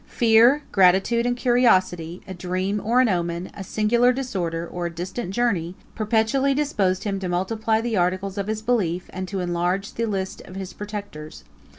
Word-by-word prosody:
3 - - -20
Fear, 235 +5 +5
gratitude, 195 +5 +3
and 245 0 0
curiosity, 185 -9 +2
a 190 - -6
dream 185 +3 -2
or 240 +4 +3
an 255 - +3
omen, 175 -2 -2
a 195 - -7
singular 235 +5 +2
disorder, 180 -11 -3
or 175 0 -4
a - - -6
distant 180 +5 -5
journey, 190 -6 0 0.2
perpetually 225 +5 +1
disposed 200 -11 0
him 200 -2 -2
to 185 -2 -4
multiply 220 +5 0
the 230 -1 -2
articles 185 +2 0
of 200 - -3
his 215 0 -3
belief, 185 -7 -1
and 185 0 -4
to 195 0 -3
enlarge 180 +3 -1
the 230 0 -2
list 190 -3 -3
of 185 - -12
his 190 -1 -6
protectors. 205 -7 -8
195 Hz, 180 wpm, -23 LUFS, 180-230 Hz, 0.2 s, Fear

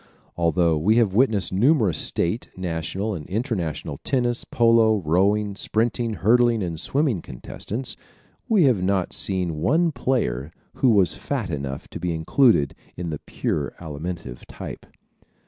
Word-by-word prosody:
Although 85 -1 +2
we 105 +8 +3
have 115 -5 +3
witnessed 110 -5 +2
numerous 110 - +3
state, 90 +8 -1
national 95 +4 -3
and 80 -6 -7
international 95 - -3
tennis, 120 -3 0
polo, 115 -2 +4
rowing, 100 +5 +2
sprinting, 110 +1 0
hurdling 115 +1 +3
and 85 -3 -4
swimming 135 - 0
contests, 110 - -6 0.5
we 210 -6 +5
have 125 -8 +4 0.3
seen 95 -3 0
not 80 - -4
one 160 - +2
player 80 - -1 0.3
who 130 - +4
was 100 -6 +4
fat 105 0 -3
enough 70 -2 -4
to - - -7
be 85 -2 -2
included 80 - +3 0.2
in 85 -1 -4
the 75 - -4
pure - - -3
Alimentive 80 -4 -6
type. - - -8
100 Hz, 135 wpm, -23 LUFS, 85-120 Hz, 0.5 s, we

